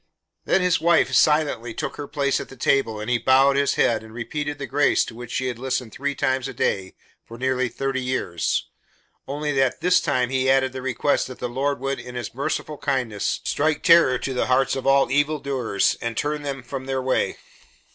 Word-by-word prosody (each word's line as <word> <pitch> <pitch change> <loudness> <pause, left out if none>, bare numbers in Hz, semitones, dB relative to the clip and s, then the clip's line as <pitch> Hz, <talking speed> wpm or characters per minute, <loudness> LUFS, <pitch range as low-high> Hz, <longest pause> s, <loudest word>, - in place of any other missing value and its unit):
Then 190 - +2
his 180 -3 +2
wife 170 0 +3
silently 145 -7 +2
took - - -4
her 145 - -5
place 140 -2 0
at - - -7
the 135 - -11
table 120 -4 +1
and 105 - -6
he 125 -1 +1
bowed 135 +3 +4
his 140 0 +2
head 115 - +2
and 110 0 -13
repeated 145 +4 -4
the 140 - -5
grace 145 +2 +2
to - - -9
which 120 +1 -9
she 130 +1 -2
had 125 -2 -3
listened 130 -3 -2
three 140 +1 -3
times 130 -1 0
a - - -8
day 95 -1 -1 0.3
for 115 - -11
nearly 130 0 0
thirty 135 +2 -2
years, 125 -10 -1 0.6
only 145 +2 -2
that 135 -2 +1
this 180 +1 +4
time 130 -6 0
he 130 0 +1
added 130 -1 +3
the 130 - -5
request 130 +2 0
that 130 - -9
the - - -3
Lord 140 +4 -1
would, 135 +1 -2
in 125 0 -9
his 120 - -5
"merciful 140 +3 -3
kindness, 125 -7 -1
strike 155 0 0
terror 165 -7 +6
to 130 +1 -4
the 125 - 0
hearts 130 +1 +2
of 135 0 -4
all 135 0 +4
evildoers 140 -7 +1
and 115 -1 -4
turn 150 0 -1
them 140 -3 -5
from 130 +1 -6
their 135 0 -1
way." 130 0 0
130 Hz, 205 wpm, -23 LUFS, 125-145 Hz, 0.6 s, terror